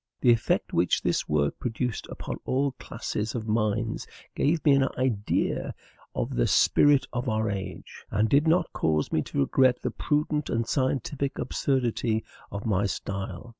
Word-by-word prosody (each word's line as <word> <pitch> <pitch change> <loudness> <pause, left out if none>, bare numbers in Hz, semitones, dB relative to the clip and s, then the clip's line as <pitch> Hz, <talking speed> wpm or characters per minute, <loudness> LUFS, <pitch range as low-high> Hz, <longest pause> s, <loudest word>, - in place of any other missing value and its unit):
The 125 - +5
effect 115 -2 +1
which 85 +2 +2
this - - 0
work 70 -1 +1
produced 125 -1 -3
upon - - -5
all 140 +2 +1
classes 105 +3 -4
of 115 -2 -4
minds 110 +1 0 0.3
gave 155 +3 +1
me 145 - +7
an 135 -1 +4
idea 120 -5 0 0.4
of - - -2
the - - +2
spirit 145 -2 +4
of 125 +1 -1
our 110 -1 0
age, 95 -1 -7
and 105 +2 +2
did 145 +6 +3
not 170 +1 +2
cause 75 -1 0
me - - +2
to - - -2
regret 125 - +3
the - - -1
prudent 150 0 -1
and 115 0 0
scientific 135 +1 -1
obscurity 120 -4 0 0.3
of 100 +1 -5
my 100 -2 +1
style. 95 +1 -5
115 Hz, 160 wpm, -27 LUFS, 105-135 Hz, 0.4 s, me